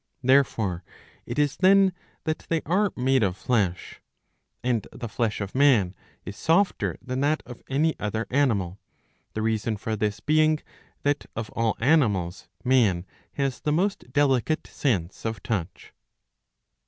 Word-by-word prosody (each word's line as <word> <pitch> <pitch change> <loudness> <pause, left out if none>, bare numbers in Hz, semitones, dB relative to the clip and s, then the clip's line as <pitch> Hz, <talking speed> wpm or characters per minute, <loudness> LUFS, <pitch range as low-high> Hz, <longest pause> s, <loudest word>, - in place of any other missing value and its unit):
Therefore 115 -9 +2 0.4
it - - -5
is 145 -2 +1
then 195 0 +5 0.3
that 155 0 -3
they 165 -1 0
are 195 +5 +2
made 130 +1 +2
of 95 -3 0
flesh. 100 -8 -1 0.6
And 120 -4 0
the 120 - -6
flesh 110 -1 -1
of 100 -1 -5
man 130 -10 +4 0.3
is 100 - -6
softer 180 - +1
than 130 0 -3
that 150 +2 +1
of 125 - -10
any 155 +4 +2
other 110 +2 -2
animal, 105 -9 +1 0.5
the 110 - -2
reason 110 0 0
^^ - - -11
for 110 +1 -2
this 105 -1 -1
being, 155 +1 +3 0.5
that 145 0 0
of 110 -1 -4
all 115 -2 0
animals 105 - +2 0.2
man 115 -9 +3 0.3
has 135 -2 -1
the 150 - -1
most 180 -4 0
delicate 145 +1 +2
sense 100 - -2
of 110 -3 -4
touch.' 95 -6 -4
125 Hz, 145 wpm, -26 LUFS, 105-145 Hz, 0.6 s, then